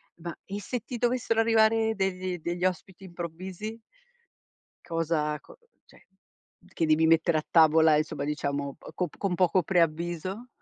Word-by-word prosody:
Ma, 170 -1 -7
e 200 +1 -6
se 245 +5 -3
ti 245 - -6
dovessero 240 -1 +1
arrivare 225 0 +3
degli 185 -2 -2
degli 175 +2 -2
ospiti 185 +1 -3
improvvisi? 185 +5 -7 1.1
cosa 165 -3 -1
co - - -16 0.3
cioè - - -21 0.7
che 165 - +1
devi 155 +1 +4
mettere 160 0 +3
a 155 - -4
tavola, 160 -1 +5
insomma 150 -2 -2
diciamo, 140 -1 -3
o - - -12
co 180 - -1
p - - -19
con 195 -3 -1
poco 180 0 +3
preavviso? 175 +5 -1
175 Hz, 145 wpm, -28 LUFS, 160-195 Hz, 1.1 s, tavola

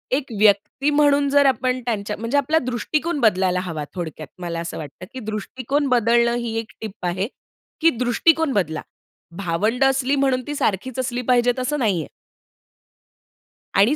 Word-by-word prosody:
एक 275 0 -1
व्यक्ती 215 +7 +3
म्हणून 290 -1 +3
जर 285 0 +4
आपण 255 -1 +2
त्यांच्या, 210 -3 -2
म्हणजे 230 +6 -1
आपला 295 +3 +2
दृष्टिकोन 295 +6 -1
बदलायला 185 -6 +2
हवा. 165 -5 -4
थोडक्यात 160 -4 -5
मला 170 -1 -3
असं 170 0 -5
वाटतं, 155 +4 -8
की 260 - -6
दृष्टिकोन 255 +6 -2
बदलणं 235 0 +3
ही 235 -2 -3
एक 225 0 -7
टिप 215 -4 -7
आहे. 185 +3 -1 0.5
की 330 - +6
दृष्टिकोन 320 +5 +3
बदला. 160 -7 0 0.6
भावंड 200 +8 0
असली 270 0 +2
म्हणून 270 -2 +2
ती 295 - -3
सारखीच 255 +2 -1
असली 250 -1 -1
पाहिजे, 245 -1 +4
असं 295 +3 -1
नाहीये. 195 - 0 1.7
आणि 210 +9 +5
240 Hz, 150 wpm, -22 LUFS, 200-270 Hz, 1.7 s, की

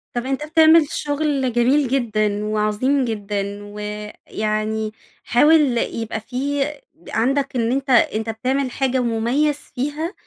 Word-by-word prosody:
طب 240 +1 -2
أنتَ 270 +2 -2
بتعمل 320 -1 +6
شغل 290 -4 -1
جميل 260 +4 +3
جدًا، 215 -5 0
وعظيم 215 +6 +1
جدًا 205 -2 -3
ويعني 215 +1 -4 0.3
حاول 290 -1 +4
يبقى 225 -1 -2
في 275 +4 -2 0.5
عندك 270 +3 0
إن 230 0 +1
أنتَ 270 +1 -2
أنتَ 225 -2 +3
بتعمل 255 +4 -1
حاجة 260 0 0
مميز 245 +6 +1 0.2
فيها 295 +8 -3
245 Hz, 115 wpm, -21 LUFS, 215-280 Hz, 0.5 s, بتعمل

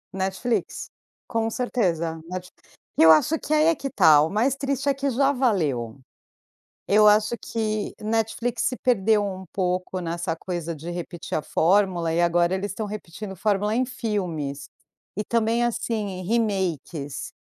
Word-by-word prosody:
Netflix, 190 +5 -2 0.4
com 225 -1 -1
certeza. 175 -10 -1
Net 180 0 -6 0.5
e - - +7
eu 160 - +9
acho 290 - +4
que 305 - -3
aí 305 0 +4
é 330 0 +4
que 275 - -4
tá, 160 - +6
o 155 - +1
mais 235 +8 +1
triste 275 0 -1
é - - +3
que 275 +1 -2
já 275 +2 +2
valeu. 155 - 0 0.9
Eu 210 +1 +6
acho 215 +2 +4
que 215 -2 -2
Netflix 225 +2 -1
se 255 - 0
perdeu 215 -3 +2
um 190 -1 -5
pouco 185 0 -1
nessa 170 -1 -3
coisa 170 -1 -4
de 160 +3 -8
repetir 175 0 -5
a - - -1
fórmula 175 0 +2
e 170 - +2
agora 175 +1 +2
eles 200 +2 -3
estão 215 +1 -4
repetindo 205 -1 -7
fórmula 210 +2 0
em 255 +2 +2
filmes. 180 - -3 0.5
E 210 - -1
também, 230 +1 +1
assim, 215 -5 -2
remakes, 180 - -2
200 Hz, 155 wpm, -24 LUFS, 175-230 Hz, 0.9 s, eu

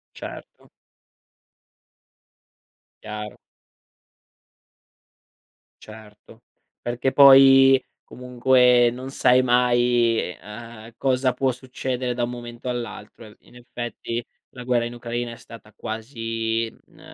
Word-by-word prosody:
Certo. - - -11 2.3
Chiaro. 105 -1 -7 2.5
Certo, 110 -1 -15 0.4
perché 120 +2 -2
poi 135 -1 +7 0.2
comunque 125 -1 +3
non 130 +2 -8
sai 130 -1 +3
mai, 120 -1 +2 0.2
ehm, 115 +2 -11
cosa 130 -1 +1
può 130 +1 0
succedere 125 0 -4
da 120 0 -2
un 120 - -2
momento 120 0 -8
all'altro. 115 -2 -7
Eh 105 - -15
in - - -22
effetti 120 -1 -6 0.2
la 125 - -11
guerra 120 -1 0
in 120 - -6
Ucraina 120 0 -5
è - - -10
stata 115 -2 -15
quasi, 115 0 -4
mhmm, - - -25
120 Hz, 100 wpm, -23 LUFS, 115-125 Hz, 2.5 s, poi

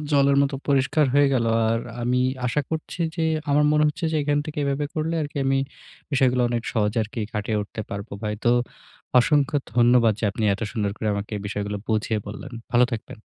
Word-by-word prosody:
জলের 140 -1 +4
মতো 140 0 0
পরিষ্কার 140 +2 +3
হয়ে 145 0 +5
গেলো। 115 -3 +2 0.2
আর 115 +1 +1 0.2
আমি 125 +1 +1 0.3
আশা 150 +5 +1
করছি 160 +2 -4 0.2
যে 165 - -1 0.3
আমার 145 +1 +4
মনে 150 0 +4
হচ্ছে 155 +3 -4
যে - - +1
এখান 145 0 +1
থেকে 150 -1 -6
এভাবে 140 +1 0
করলে 160 +1 -1
আরকি 145 0 -7
আমি 135 0 +2 0.5
বিষয়গুলো 130 -2 +3
অনেক 120 -1 -1
সহজে 105 +1 +1 0.3
কাটিয়ে 105 +1 -1
উঠতে 105 - -7
পারবো 100 0 -6
ভাই। 105 0 -1
তো 120 - +4 0.7
অসংখ্য 145 +2 +3 0.2
ধন্যবাদ 120 -2 +5
যে - - -1
আপনি 110 +2 -3
এত 100 - -9
সুন্দর 105 -4 -1
করে 110 - -2
আমাকে 100 +1 -4
এই 100 - -6
বিষয়গুলো 105 0 -3
বুঝিয়ে 110 0 0
বললেন। 105 +6 -8 0.2
ভালো 120 +1 +6
থাকবেন। 115 +2 -6
125 Hz, 190 wpm, -24 LUFS, 110-145 Hz, 0.7 s, ভালো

